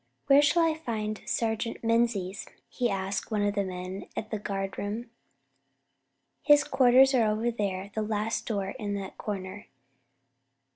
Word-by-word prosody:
"Where 280 +1 +6
shall 335 +4 +4
I 325 -1 +3
find 220 -9 -4
Sergeant 230 0 -1
Menzies?" 225 -4 0 0.2
he 245 -2 -1
asked 195 0 -2
one 210 -2 0
of 205 0 +1
the 200 -1 0
men 185 +1 -6
at 220 - -4
the 215 - -2
guardroom. 205 +3 -4 1.3
"His 290 -1 +6
quarters 265 0 +5
are 230 -4 +3
over 220 +3 0
there, 200 -3 -3
the 220 - -1
last 215 +1 -2
door 200 -4 -1
in 205 -2 -2
that 195 -1 -7
corner." 200 0 -5
215 Hz, 145 wpm, -28 LUFS, 200-235 Hz, 1.3 s, Where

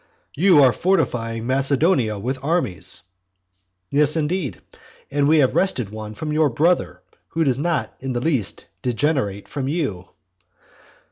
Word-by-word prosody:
"You 170 -2 +5
are 130 -2 +5
fortifying 115 -11 0
Macedonia 135 - +2
with 130 +6 -4
armies". 100 - -2 0.9
Yes, 150 +1 +4
indeed, 160 -1 -2 0.5
and 140 0 +2
we 160 +2 +5
have 135 -4 +3
wrested 125 - 0
one 110 0 -7
from 150 +4 -4
your 155 -1 +3
brother, 165 +8 0 0.2
who 165 - -1
does 135 -3 +1
not 150 -8 -1
in 135 -1 -4
the 120 - -1
least 125 - -2 0.2
degenerate 120 -5 -1
from 135 -3 -4
you. 135 - -2
135 Hz, 135 wpm, -21 LUFS, 115-155 Hz, 0.9 s, You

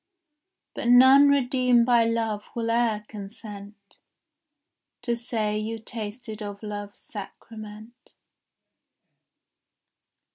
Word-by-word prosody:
But - - -4
none 260 +3 +7
redeemed 250 -3 +3
by 240 -2 +4
love 225 -2 -1
will 230 -1 -1
e'er 230 -3 +1
consent 205 -1 -11 1.0
To 240 -1 0
say 220 -3 -2
you 220 +1 -4
tasted 220 0 -7
of 205 0 -7
love's 205 -1 -6
sacrament. 215 +3 -11
225 Hz, 85 wpm, -25 LUFS, 210-240 Hz, 1.0 s, none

